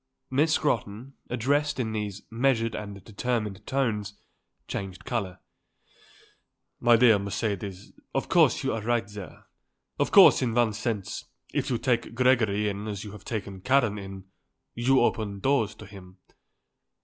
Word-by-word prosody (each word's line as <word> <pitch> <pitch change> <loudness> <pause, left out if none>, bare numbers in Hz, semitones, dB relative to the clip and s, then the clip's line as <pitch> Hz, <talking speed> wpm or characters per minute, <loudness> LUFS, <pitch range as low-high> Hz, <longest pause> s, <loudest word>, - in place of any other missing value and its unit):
Miss 150 +4 +3
Scrotton, 120 -3 -1 0.2
addressed 140 +4 0
in 110 -3 -1
these 105 -2 -4
measured 115 -1 +1
and 100 -2 -7
determined 110 -2 -3
tones, 105 -7 -1 0.5
changed 95 -2 -6
colour. 105 -8 -3 1.4
"My 120 -1 +5
dear 115 -3 +6
Mercedes, 100 -1 -4 0.2
of - - 0
course - - +4
you - - 0
are 110 - -3
right 120 -1 0
there. 100 -5 -10 0.5
Of - - +2
course - - +8
in 120 -3 0
one 120 -3 +3
sense, 105 -3 -3 0.3
if - - -1
you 125 - +1
take 120 -1 -1
Gregory 115 -5 +3
in 100 +1 -4
as 100 -2 -4
you 105 - -8
have 105 -1 -12
taken 100 -4 -5
Karen 120 -4 +2
in, 95 -1 -8 0.5
you 130 +3 +3
open 105 -4 0
doors 130 -4 +1
to 105 - -11
him. 95 -2 -13
110 Hz, 145 wpm, -27 LUFS, 100-120 Hz, 1.4 s, course